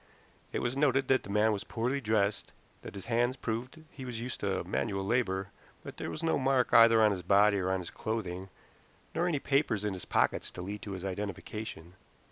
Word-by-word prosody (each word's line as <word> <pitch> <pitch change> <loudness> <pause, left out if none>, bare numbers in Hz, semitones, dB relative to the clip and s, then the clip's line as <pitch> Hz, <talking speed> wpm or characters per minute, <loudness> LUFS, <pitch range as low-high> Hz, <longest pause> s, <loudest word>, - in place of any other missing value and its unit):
It - - -2
was 120 +2 -1
noted 135 -2 +2
that 130 -1 +4
the - - -12
man 105 +2 +3
was 100 - -3
poorly 125 +4 -2
dressed, 105 -3 0 0.3
that - - -9
his 100 - -7
hands 120 +2 +1
proved 125 +7 -4
he 135 - -9
was 125 -3 -5
used 125 +2 -4
to 95 -3 -1
manual 95 +2 -2
labor, 95 -4 0 0.3
but - - -9
there - - -4
was 80 - -5
no 160 - +2
mark 130 -2 +2
either 115 -1 +8
on 105 - +5
his 95 -2 -2
body 100 +3 +4
or 95 0 -1
on 95 -1 0
his 85 - -7
clothing, 95 -4 -4 0.6
nor 175 +2 +1
any 165 -4 +1
papers 135 -7 +1
in 105 - 0
his 90 - -7
pockets - - +1
to 90 - -7
lead 100 +2 -5
to 100 - -6
his 95 0 -6
identification. 95 -2 -5
110 Hz, 210 wpm, -31 LUFS, 95-125 Hz, 0.6 s, either